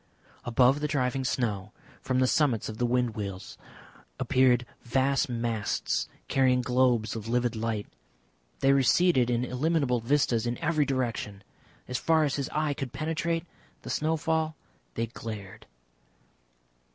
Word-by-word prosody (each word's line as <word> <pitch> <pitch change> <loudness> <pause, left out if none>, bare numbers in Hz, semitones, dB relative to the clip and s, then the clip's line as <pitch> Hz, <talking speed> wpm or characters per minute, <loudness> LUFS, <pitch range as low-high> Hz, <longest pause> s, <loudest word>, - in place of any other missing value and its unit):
Above 125 +3 +4
the 150 - -1
driving 135 -2 0
snow, 105 -6 -1 0.3
from 130 - -1
the 130 - +4
summits 130 -5 +2
of 110 0 -7
the 120 - +2
wind 125 -1 +1
wheels, 100 -3 -6 0.6
appeared 125 -1 +3 0.2
vast 135 +3 +1
masts 115 -3 -1 0.2
carrying 130 -1 +3
globes 125 -3 +2
of 110 -1 -6
livid 120 0 0
light. 110 -2 -2 0.8
They 135 - +5
receded 135 -1 +4
in 120 0 +1
illimitable 130 -1 +1
vistas 120 -2 +1
in 120 - -2
every 155 -2 +1
direction. 120 -7 -2 0.4
As 125 0 -2
far 160 -1 +3
as 145 -2 0
his 140 - -2
eye 150 -1 0
could 135 -2 -6
penetrate 165 +3 -2 0.4
the - - -5
snowfall 160 0 0 0.4
they 115 - 0
glared. 110 -4 -8
125 Hz, 135 wpm, -28 LUFS, 115-145 Hz, 0.8 s, They